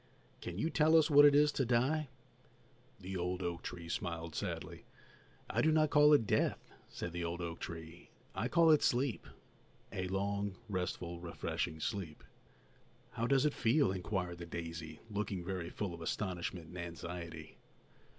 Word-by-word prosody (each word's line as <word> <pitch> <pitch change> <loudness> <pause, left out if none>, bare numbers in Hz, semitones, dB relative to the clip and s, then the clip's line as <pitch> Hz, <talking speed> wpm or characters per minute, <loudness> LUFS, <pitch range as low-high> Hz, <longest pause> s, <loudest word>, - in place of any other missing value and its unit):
Can 90 - -5
you 160 +11 0
tell 160 +1 +5
us 160 0 +4
what 145 0 +9
it 145 -1 +7
is 150 0 +5
to 135 - 0
die?" 130 +6 +2 0.9
The 95 0 -6
old 90 +1 -2
oak 85 -1 -3
tree 85 -1 -7
smiled 85 -5 -3
sadly. - - -5 0.6
"I - - +1
do 160 - +4
not 155 -1 +3
call 150 0 +7
it 140 -7 +5
death," - - 0 0.2
said 85 - -5
the 85 0 -3
old 85 +1 -3
oak 85 -1 -4
tree; 80 +1 -8 0.2
"I - - -1
call 170 -1 +5
it 155 - +6
sleep, 125 -1 +1 0.7
a 95 - -2
long, 100 +1 -1
restful, 90 -3 -3
refreshing 85 -2 -3
sleep." 95 -5 -4 0.9
"How 115 +1 -1
does 135 +1 +4
it 150 - +2
feel?" 125 0 +3
inquired 90 -2 -3
the 85 - -7
daisy, 80 -2 -6
looking 100 -3 -2
very 90 -3 -3
full 100 -4 -4
of 85 - -9
astonishment 85 -2 -3
and 90 - -8
anxiety. 85 -1 -7
95 Hz, 160 wpm, -35 LUFS, 85-125 Hz, 0.9 s, what